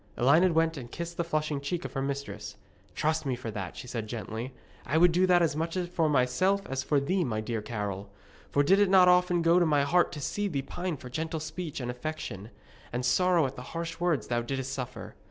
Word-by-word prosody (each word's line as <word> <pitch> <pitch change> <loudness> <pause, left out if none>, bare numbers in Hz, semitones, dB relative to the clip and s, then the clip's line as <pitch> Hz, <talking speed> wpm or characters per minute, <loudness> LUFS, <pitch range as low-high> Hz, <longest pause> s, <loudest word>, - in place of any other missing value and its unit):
Elined 160 +8 +4
went 165 -1 +2
and 120 -3 -8
kissed 170 0 -6
the 170 - +1
flushing 155 -3 -1
cheek 170 +5 -3
of - - -6
her 135 - -2
mistress. 135 -7 -4 0.4
'Trust 155 +1 0
me 135 -3 -1
for 120 -2 -6
that,' 100 -4 -6
she - - -7
said 115 -3 -4
gently. 110 +3 -5 0.4
'I 150 - +1
would 175 +1 +6
do 180 +2 +3
that 175 -1 +5
as 160 -3 +1
much 165 +3 -2
for 175 -3 0
myself 165 +9 +2
as 135 -5 -2
for 145 +2 +2
thee, 180 +7 0
my 110 -6 -2
dear 110 0 -3
Carol. 100 -3 -4 0.4
For 145 - +3
did 195 +7 +4
it 205 -2 +4
not 185 -1 +7
often 180 -1 +4
go 170 +2 +5
to 175 - +4
my 145 -2 +3
heart 175 +5 +3
to 150 - -6
see 205 +8 -2
thee 140 -8 -2
pine 175 +2 -4
for 125 -1 -10
gentle 160 +3 -3
speech 155 0 -5
and 125 -1 -3
affection, 125 -6 -6 0.4
and 125 +1 -2
sorrow 175 +4 +3
at 130 - -4
the - - -8 0.2
harsh 165 0 -4
words 175 -5 +1
thou 120 -1 0
didst 135 +2 -3
suffer? 125 -5 -6
150 Hz, 225 wpm, -29 LUFS, 125-170 Hz, 0.4 s, not